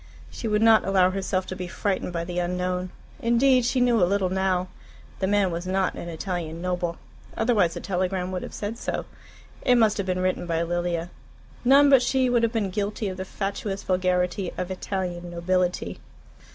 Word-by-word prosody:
She 230 Hz, -, -5 dB
would 210 Hz, 0 st, +2 dB
not 225 Hz, -1 st, +6 dB
allow 185 Hz, -1 st, +3 dB
herself 190 Hz, -1 st, -1 dB
to 185 Hz, -, -6 dB
be 180 Hz, -1 st, -5 dB
frightened 190 Hz, +1 st, -2 dB
by 170 Hz, -1 st, -3 dB
the 175 Hz, 0 st, -3 dB
unknown. 180 Hz, +1 st, -1 dB, 0.3 s
Indeed 250 Hz, 0 st, +3 dB
she 255 Hz, +2 st, +1 dB
knew 240 Hz, -3 st, +3 dB
a 175 Hz, -, +3 dB
little 195 Hz, -2 st, +1 dB
now. 185 Hz, -1 st, +1 dB, 0.5 s
The 190 Hz, -, 0 dB
man 200 Hz, -2 st, +2 dB
was 170 Hz, +2 st, -4 dB
not 190 Hz, 0 st, +1 dB
an 170 Hz, -, -7 dB
Italian 165 Hz, -1 st, -4 dB
noble, 180 Hz, -1 st, -2 dB, 0.4 s
otherwise 215 Hz, -7 st, +2 dB
the -, -, -5 dB
telegram 185 Hz, -1 st, -1 dB
would 180 Hz, -1 st, -3 dB
have -, -, -7 dB
said 215 Hz, +3 st, -4 dB
so. -, -, -3 dB, 0.6 s
It 250 Hz, -, +4 dB
must 220 Hz, -3 st, +4 dB
have 200 Hz, -2 st, -2 dB
been 185 Hz, 0 st, 0 dB
written 185 Hz, -1 st, -1 dB
by 165 Hz, -1 st, 0 dB
Lilia. 175 Hz, 0 st, -2 dB, 0.5 s
None 280 Hz, +3 st, +6 dB
but 270 Hz, -2 st, +7 dB
she 255 Hz, 0 st, +2 dB
would 240 Hz, -1 st, +3 dB
have 230 Hz, -1 st, +2 dB
been 215 Hz, -5 st, -1 dB
guilty 205 Hz, +1 st, -2 dB
of 185 Hz, -, -6 dB
the 190 Hz, -, -4 dB
fatuous 195 Hz, 0 st, -4 dB
vulgarity 180 Hz, 0 st, 0 dB
of 180 Hz, +1 st, -3 dB
"Italian 180 Hz, -2 st, -4 dB
nobility." 180 Hz, +1 st, -1 dB
185 Hz, 190 wpm, -25 LUFS, 180-210 Hz, 0.6 s, but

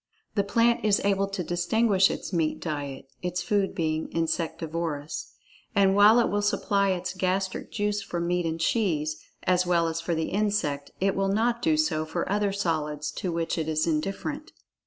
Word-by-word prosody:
The 200 Hz, -, +2 dB
plant 230 Hz, +4 st, +2 dB
is 210 Hz, -2 st, +3 dB
able 195 Hz, 0 st, +2 dB
to 195 Hz, -2 st, -3 dB
distinguish 190 Hz, +4 st, +2 dB
its -, -, -5 dB
meat 160 Hz, -3 st, 0 dB
diet 145 Hz, -4 st, -5 dB
(its 180 Hz, 0 st, -2 dB
food 200 Hz, -2 st, 0 dB
being 160 Hz, -3 st, -1 dB
insectivorous), 165 Hz, -2 st, -3 dB, 0.4 s
and 195 Hz, -1 st, +4 dB
while 210 Hz, +3 st, +7 dB
it 235 Hz, -, +3 dB
will 205 Hz, 0 st, 0 dB
supply 200 Hz, -1 st, +1 dB
its 185 Hz, -1 st, -2 dB
gastric 190 Hz, +1 st, -1 dB
juice 205 Hz, -1 st, -1 dB
for 180 Hz, -3 st, -4 dB
meat 175 Hz, 0 st, 0 dB
and 165 Hz, 0 st, -3 dB
cheese, 155 Hz, -6 st, 0 dB, 0.3 s
as 180 Hz, 0 st, +2 dB
well 170 Hz, -2 st, +3 dB
as 165 Hz, 0 st, -2 dB
for 165 Hz, 0 st, -1 dB
the 160 Hz, 0 st, -1 dB
insect, 200 Hz, -9 st, 0 dB
it 195 Hz, +1 st, +1 dB
will 195 Hz, 0 st, +1 dB
not 230 Hz, +4 st, +1 dB
do 315 Hz, +1 st, +2 dB
so 300 Hz, -, +1 dB
for 165 Hz, +2 st, -3 dB
other 205 Hz, 0 st, +1 dB
solids 155 Hz, -6 st, -2 dB
to 180 Hz, -, -3 dB
which 165 Hz, 0 st, -1 dB
it 160 Hz, 0 st, -2 dB
is 155 Hz, 0 st, +1 dB
indifferent. 195 Hz, -, -2 dB
180 Hz, 180 wpm, -27 LUFS, 160-200 Hz, 0.4 s, while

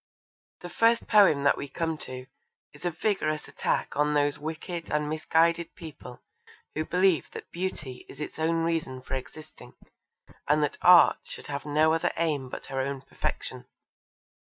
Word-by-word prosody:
The 175 Hz, -, -7 dB
first 230 Hz, +4 st, +3 dB
poem 195 Hz, -10 st, +5 dB
that 140 Hz, -, +4 dB
we 140 Hz, -, -4 dB
come 165 Hz, +2 st, -2 dB
to 130 Hz, 0 st, -7 dB, 0.5 s
is 150 Hz, +4 st, -12 dB
a -, -, +3 dB
vigorous 160 Hz, -3 st, -1 dB
attack -, -, -2 dB
on 150 Hz, +1 st, +2 dB
those 145 Hz, -1 st, +1 dB
wicked 165 Hz, +2 st, -5 dB
and 150 Hz, 0 st, 0 dB
misguided 165 Hz, +2 st, +1 dB
people 145 Hz, -7 st, -11 dB, 0.5 s
who 155 Hz, -, -2 dB
believe 180 Hz, -3 st, +2 dB
that -, -, -9 dB
Beauty 160 Hz, -8 st, -5 dB
is -, -, -12 dB
its 150 Hz, -, -6 dB
own 165 Hz, +1 st, +1 dB
reason 155 Hz, -6 st, -2 dB
for -, -, -6 dB
existing, 135 Hz, +4 st, -8 dB, 0.7 s
and 150 Hz, +1 st, +3 dB
that 145 Hz, -, -2 dB
Art 180 Hz, -1 st, +7 dB
should -, -, -7 dB
have 140 Hz, +1 st, -4 dB
no 155 Hz, +2 st, +3 dB
other 165 Hz, -, +1 dB
aim 150 Hz, -6 st, 0 dB
but -, -, -7 dB
her 135 Hz, -, -4 dB
own 135 Hz, 0 st, -3 dB
perfection. 135 Hz, -, -5 dB
155 Hz, 160 wpm, -28 LUFS, 145-170 Hz, 0.7 s, Art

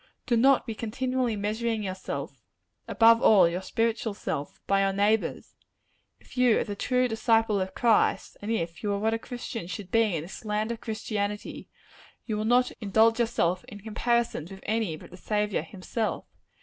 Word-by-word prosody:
Do 240 Hz, -, +2 dB
not 265 Hz, +3 st, +4 dB
be 230 Hz, -, -4 dB
continually 250 Hz, +2 st, -1 dB
measuring 215 Hz, +2 st, -1 dB
yourself 190 Hz, -1 st, -5 dB, 0.5 s
above 230 Hz, 0 st, +5 dB
all, 195 Hz, -5 st, +6 dB
your 175 Hz, +2 st, -2 dB
spiritual 225 Hz, +1 st, -1 dB
self 145 Hz, -7 st, -4 dB
by 195 Hz, 0 st, +2 dB
your 195 Hz, 0 st, +2 dB
neighbors. 205 Hz, +2 st, 0 dB, 0.7 s
If -, -, -17 dB
you 250 Hz, -3 st, +4 dB
are -, -, +1 dB
the 205 Hz, -, -5 dB
true 250 Hz, +4 st, +1 dB
disciple 225 Hz, -2 st, +2 dB
of 185 Hz, 0 st, -4 dB
Christ, 230 Hz, -3 st, +2 dB
and 205 Hz, -, -5 dB
if 170 Hz, -7 st, -2 dB
you 210 Hz, -, -1 dB
are -, -, 0 dB
what 220 Hz, +2 st, +1 dB
a 225 Hz, -, -1 dB
Christian 240 Hz, -5 st, -6 dB
should 195 Hz, 0 st, -7 dB
be 225 Hz, -5 st, +3 dB
in 155 Hz, -, -3 dB
this 180 Hz, +7 st, -10 dB
land 215 Hz, +1 st, -1 dB
of 230 Hz, -, -6 dB
Christianity, 210 Hz, -2 st, -4 dB, 0.6 s
you 220 Hz, -, -2 dB
will 215 Hz, +1 st, -2 dB
not 250 Hz, +2 st, +3 dB
indulge 220 Hz, +3 st, +3 dB
yourself 185 Hz, -6 st, +1 dB
in 205 Hz, -5 st, -11 dB
comparisons 225 Hz, -5 st, -1 dB
with 195 Hz, -1 st, -10 dB
any 215 Hz, -6 st, -1 dB
but -, -, -14 dB
the 180 Hz, -, -11 dB
Saviour 210 Hz, +1 st, -1 dB
himself. 210 Hz, +3 st, -4 dB
220 Hz, 175 wpm, -27 LUFS, 200-230 Hz, 0.7 s, all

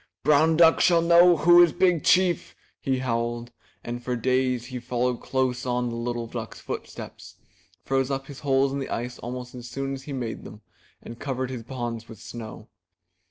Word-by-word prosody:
''Brown 155 Hz, +2 st, +4 dB
duck 165 Hz, -1 st, +6 dB
shall 170 Hz, -2 st, +4 dB
know 170 Hz, +1 st, +6 dB
who 175 Hz, +3 st, +7 dB
is 170 Hz, -3 st, +5 dB
Big 175 Hz, -4 st, +2 dB
Chief! 180 Hz, -1 st, +2 dB, 0.2 s
he 135 Hz, -2 st, -1 dB
howled, 120 Hz, -1 st, -2 dB, 0.3 s
and 120 Hz, +1 st, -5 dB
for 125 Hz, 0 st, -2 dB
days 125 Hz, 0 st, 0 dB
he 125 Hz, -, -3 dB
followed 125 Hz, 0 st, -1 dB
close 130 Hz, -1 st, -1 dB
on 125 Hz, -1 st, -1 dB
the 115 Hz, -, -5 dB
little 120 Hz, 0 st, -3 dB
duck*s 115 Hz, -1 st, -7 dB
footsteps, -, -, -8 dB, 0.5 s
froze 135 Hz, 0 st, 0 dB
up 135 Hz, -1 st, -2 dB
his 140 Hz, -1 st, -10 dB
holes 135 Hz, -1 st, +2 dB
in 140 Hz, -, -2 dB
the 135 Hz, -, -5 dB
ice 125 Hz, +1 st, -4 dB
almost 125 Hz, 0 st, -6 dB
as 125 Hz, -1 st, -9 dB
soon 135 Hz, +1 st, -3 dB
as 135 Hz, -, -6 dB
he 145 Hz, -, -9 dB
made 120 Hz, -4 st, -4 dB
them 105 Hz, -, -11 dB, 0.4 s
and 115 Hz, 0 st, -10 dB
covered 130 Hz, -1 st, -3 dB
his 125 Hz, -3 st, -5 dB
ponds 120 Hz, -1 st, -5 dB
with 110 Hz, -, -11 dB
snow. 110 Hz, -1 st, -9 dB
130 Hz, 185 wpm, -25 LUFS, 120-140 Hz, 0.5 s, who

